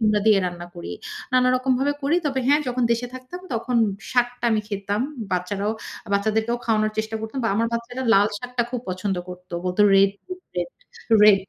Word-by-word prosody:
কুমড়া 210 Hz, -2 st, +3 dB
দিয়ে 215 Hz, -2 st, +7 dB
রান্না 175 Hz, -1 st, -5 dB
করি। 170 Hz, -, -6 dB, 0.4 s
নানা 255 Hz, 0 st, +5 dB
রকম 260 Hz, +1 st, +1 dB
ভাবে 285 Hz, +2 st, +2 dB
করি। 290 Hz, +5 st, +2 dB
তবে 265 Hz, -2 st, 0 dB
হ্যাঁ, 290 Hz, +1 st, +5 dB
যখন 250 Hz, 0 st, -1 dB
দেশে 240 Hz, +1 st, -1 dB
থাকতাম 255 Hz, +8 st, -8 dB
তখন 235 Hz, +2 st, -1 dB, 0.4 s
শাকটা 245 Hz, 0 st, +1 dB
আমি 220 Hz, -1 st, +2 dB
খেতাম। 200 Hz, 0 st, -2 dB, 0.3 s
বাচ্চারাও, 195 Hz, +4 st, -1 dB, 0.4 s
বাচ্চাদেরকেও 220 Hz, +3 st, +1 dB
খাওয়ানোর 215 Hz, -1 st, +2 dB
চেষ্টা 220 Hz, 0 st, -2 dB
করতাম। 220 Hz, +5 st, -5 dB
বা 225 Hz, -, +3 dB
আমার 230 Hz, -, +2 dB
বাচ্চারা 240 Hz, +2 st, -4 dB
লাল 200 Hz, +1 st, +6 dB
শাকটা 245 Hz, 0 st, -2 dB
খুব 250 Hz, -, -2 dB
পছন্দ 185 Hz, +1 st, -2 dB
করত। 180 Hz, 0 st, -10 dB
বলতো 180 Hz, +3 st, +2 dB
রেড, 195 Hz, 0 st, +6 dB, 0.5 s
রেড, -, -, -1 dB, 0.5 s
রেড 205 Hz, -2 st, +8 dB
220 Hz, 180 wpm, -23 LUFS, 200-250 Hz, 0.5 s, রেড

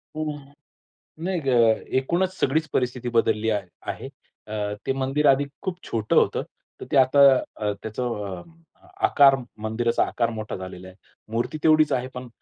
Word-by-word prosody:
हो. 155 Hz, -1 st, -2 dB, 0.9 s
नाही 185 Hz, -1 st, -1 dB
ग, 140 Hz, -, -8 dB, 0.5 s
एकूणच 175 Hz, +8 st, 0 dB
सगळीच 155 Hz, +4 st, +1 dB
परिस्थिती 125 Hz, -1 st, -1 dB
बदलली 110 Hz, -1 st, +2 dB
आहे 105 Hz, -4 st, -1 dB, 0.2 s
आहे. -, -, -8 dB, 0.4 s
अ, 105 Hz, -1 st, -3 dB
ते -, -, 0 dB
मंदिर 135 Hz, +3 st, -1 dB
आधी 140 Hz, +1 st, +4 dB, 0.2 s
खूप 185 Hz, -3 st, -3 dB
छोटं 110 Hz, -2 st, -1 dB
होतं. -, -, +3 dB, 0.4 s
तर -, -, -5 dB
ते 140 Hz, -, +3 dB
आता 130 Hz, +2 st, +4 dB, 0.4 s
अ, 105 Hz, -1 st, -1 dB
त्याचा 110 Hz, +3 st, -4 dB
अ, 105 Hz, -7 st, -4 dB, 0.6 s
आकार, 140 Hz, -, +6 dB, 0.3 s
मंदिराचा 115 Hz, +2 st, +1 dB
आकार 115 Hz, -1 st, -1 dB
मोठा 110 Hz, -2 st, -5 dB
झालेला 95 Hz, 0 st, -8 dB
आहे. 95 Hz, -, -14 dB, 0.4 s
मूर्ती 120 Hz, +7 st, -2 dB
तेवढीच 155 Hz, -1 st, +5 dB
आहे. 125 Hz, 0 st, -1 dB
पण 125 Hz, 0 st, -7 dB
125 Hz, 155 wpm, -24 LUFS, 110-145 Hz, 0.9 s, आकार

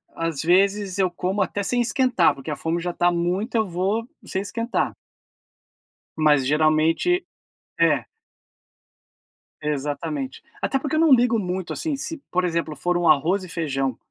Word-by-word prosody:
às 165 Hz, -4 st, -2 dB
vezes 195 Hz, +3 st, +2 dB
eu 185 Hz, -2 st, +2 dB
como 185 Hz, +3 st, -2 dB
até 200 Hz, +2 st, -1 dB
sem 245 Hz, +4 st, +1 dB
esquentar, 250 Hz, -, +3 dB
porque 135 Hz, +3 st, -9 dB
a 150 Hz, -, -1 dB
fome 165 Hz, +3 st, -2 dB
já 175 Hz, 0 st, -3 dB
tá 175 Hz, 0 st, +2 dB
muita, 180 Hz, +7 st, -1 dB
eu 220 Hz, -2 st, +1 dB
vou 195 Hz, +7 st, -1 dB, 0.2 s
sem 190 Hz, -2 st, -2 dB
esquentar. 230 Hz, +4 st, -2 dB, 1.2 s
Mas, 150 Hz, -4 st, +4 dB
geralmente 155 Hz, -, +2 dB, 0.6 s
é. 150 Hz, -8 st, +3 dB, 1.6 s
Exatamente. 145 Hz, -1 st, -3 dB, 0.2 s
Até 270 Hz, -, +1 dB
porque 290 Hz, +2 st, -2 dB
eu -, -, +2 dB
não 325 Hz, -2 st, +4 dB
ligo 240 Hz, -3 st, +5 dB
muito, 185 Hz, -2 st, -3 dB
assim, 315 Hz, -3 st, -2 dB
se, 320 Hz, +3 st, -5 dB
por 180 Hz, 0 st, +1 dB
exemplo, 165 Hz, -3 st, -2 dB
for 175 Hz, +3 st, -1 dB
um 175 Hz, -1 st, +1 dB
arroz 170 Hz, +7 st, +3 dB
e 180 Hz, -, -9 dB
feijão 135 Hz, -7 st, -2 dB
180 Hz, 155 wpm, -23 LUFS, 155-210 Hz, 1.6 s, ligo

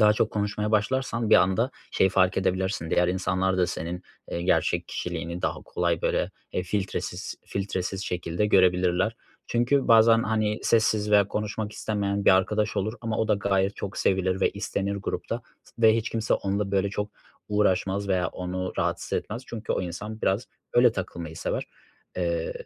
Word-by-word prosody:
daha 105 Hz, 0 st, +7 dB
çok 110 Hz, +1 st, +1 dB
konuşmaya 105 Hz, 0 st, -1 dB
başlarsan 115 Hz, +1 st, 0 dB
bir -, -, +8 dB
anda 95 Hz, +8 st, +2 dB, 0.2 s
şeyi 95 Hz, -, +3 dB
fark 95 Hz, 0 st, +3 dB
edebilirsin, 95 Hz, -3 st, -1 dB
diğer 90 Hz, 0 st, +3 dB
insanlar 95 Hz, 0 st, 0 dB
da 90 Hz, -, +3 dB
senin, 85 Hz, +2 st, -4 dB, 0.3 s
ııı, 85 Hz, -, -2 dB
gerçek 90 Hz, -, +1 dB
kişiliğini 85 Hz, 0 st, -4 dB
daha -, -, -2 dB
kolay 85 Hz, -2 st, -1 dB
böyle, -, -, 0 dB, 0.2 s
eee, 90 Hz, -, -1 dB
filtresiz 95 Hz, +1 st, -3 dB
filtresiz 95 Hz, 0 st, -3 dB
şekilde 90 Hz, +3 st, -1 dB
görebilirler. 90 Hz, +2 st, +3 dB, 0.3 s
Çünkü 120 Hz, +4 st, +1 dB
bazen, 115 Hz, 0 st, +6 dB
hani, 110 Hz, -1 st, 0 dB
sessiz 110 Hz, -2 st, +2 dB
veya 100 Hz, -1 st, +5 dB
konuşmak 105 Hz, 0 st, -3 dB
istemeyen 100 Hz, -2 st, -2 dB
bir -, -, +7 dB
arkadaş 105 Hz, +3 st, 0 dB
olur 105 Hz, +3 st, -1 dB
ama 115 Hz, -2 st, -2 dB
o 110 Hz, -, 0 dB
da 105 Hz, -, +4 dB
gayet 100 Hz, 0 st, 0 dB
çok 100 Hz, -, -5 dB
sevilir 95 Hz, 0 st, +1 dB
ve -, -, +3 dB
istenir 100 Hz, 0 st, -2 dB
grupta 115 Hz, +4 st, -4 dB, 0.2 s
s -, -, -21 dB
ve 110 Hz, 0 st, +7 dB
hiç 115 Hz, -, -2 dB
kimse 115 Hz, -1 st, +1 dB
onunla 100 Hz, 0 st, -1 dB
böyle 100 Hz, 0 st, +2 dB
çok 105 Hz, +1 st, -3 dB, 0.4 s
uğraşmaz 100 Hz, -1 st, +1 dB
veya 90 Hz, -2 st, +1 dB
onu 90 Hz, 0 st, -4 dB
rahatsız -, -, -1 dB
etmez 115 Hz, +5 st, -2 dB
çünkü 110 Hz, -2 st, -4 dB
o -, -, -1 dB
insan 105 Hz, +5 st, -6 dB
biraz 100 Hz, +6 st, +1 dB, 0.3 s
öyle 120 Hz, -1 st, +5 dB
takılmayı 85 Hz, -5 st, -5 dB
sever, -, -, -2 dB, 0.5 s
eee, 85 Hz, -2 st, -1 dB
100 Hz, 165 wpm, -26 LUFS, 95-110 Hz, 0.5 s, bir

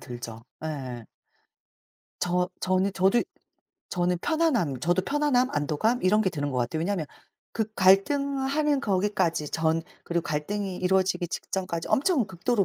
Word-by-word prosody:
들죠. 120 Hz, -2 st, -8 dB, 0.2 s
예. 130 Hz, -6 st, -5 dB, 1.2 s
저 180 Hz, 0 st, +1 dB
저는 185 Hz, +1 st, +1 dB
저도 190 Hz, +5 st, +3 dB, 0.7 s
저는 180 Hz, -1 st, 0 dB
편안함 250 Hz, -, +1 dB
저도 175 Hz, +2 st, +2 dB
편안함 275 Hz, -1 st, +2 dB
안도감 155 Hz, -, 0 dB
이런 205 Hz, +4 st, +4 dB
게 190 Hz, -, +1 dB
드는 145 Hz, -4 st, -3 dB
것 130 Hz, -, -1 dB
같아요. 125 Hz, +6 st, -1 dB
왜냐하면 175 Hz, -2 st, -1 dB, 0.5 s
그 220 Hz, -2 st, -1 dB
갈등하는 275 Hz, +9 st, +3 dB
거기까지 185 Hz, -, 0 dB
전 160 Hz, 0 st, +1 dB, 0.2 s
그리고 170 Hz, 0 st, -1 dB
갈등이 185 Hz, +6 st, -3 dB
이루어지기 185 Hz, -1 st, +1 dB
직전까지 185 Hz, -2 st, -3 dB
엄청 280 Hz, -, +2 dB
극도로 195 Hz, +4 st, 0 dB
185 Hz, 305 characters per minute, -27 LUFS, 160-225 Hz, 1.2 s, 이런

